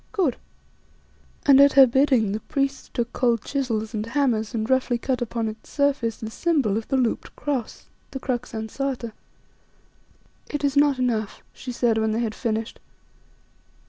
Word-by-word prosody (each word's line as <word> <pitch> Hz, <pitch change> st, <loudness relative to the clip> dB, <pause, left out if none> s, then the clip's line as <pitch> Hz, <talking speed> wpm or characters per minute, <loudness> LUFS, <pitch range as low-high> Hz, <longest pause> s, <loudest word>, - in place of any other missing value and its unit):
Good," 335 Hz, -, +1 dB, 1.1 s
and 275 Hz, -1 st, +7 dB
at 280 Hz, 0 st, +6 dB
her 270 Hz, -1 st, +9 dB
bidding 255 Hz, -4 st, +3 dB
the 210 Hz, -, -2 dB
priests 275 Hz, +3 st, -2 dB
took 240 Hz, -1 st, -3 dB
cold 235 Hz, -3 st, +1 dB
chisels 230 Hz, -5 st, -2 dB
and 215 Hz, -1 st, -2 dB
hammers 230 Hz, -2 st, 0 dB
and 220 Hz, -1 st, -1 dB
roughly 260 Hz, -1 st, +2 dB
cut 255 Hz, +1 st, -2 dB
upon 230 Hz, -1 st, -2 dB
its 215 Hz, 0 st, -8 dB
surface 275 Hz, -6 st, 0 dB
the 220 Hz, -2 st, -7 dB
symbol 280 Hz, -, +1 dB
of 220 Hz, 0 st, -3 dB
the 270 Hz, -, +1 dB
looped 245 Hz, -3 st, -1 dB
cross 270 Hz, -6 st, -4 dB, 0.2 s
the 270 Hz, -, -6 dB
crux 250 Hz, -2 st, -3 dB
ansata. 235 Hz, +2 st, -3 dB, 1.4 s
"It 295 Hz, 0 st, -3 dB
is 280 Hz, -1 st, +1 dB
not 285 Hz, -1 st, +4 dB
enough," 230 Hz, -5 st, -1 dB
she 255 Hz, -, -7 dB
said 235 Hz, -2 st, +1 dB
when 220 Hz, 0 st, +1 dB
they 225 Hz, -, 0 dB
had 225 Hz, -2 st, -2 dB
finished. 225 Hz, -1 st, -3 dB
245 Hz, 160 wpm, -24 LUFS, 220-275 Hz, 1.4 s, her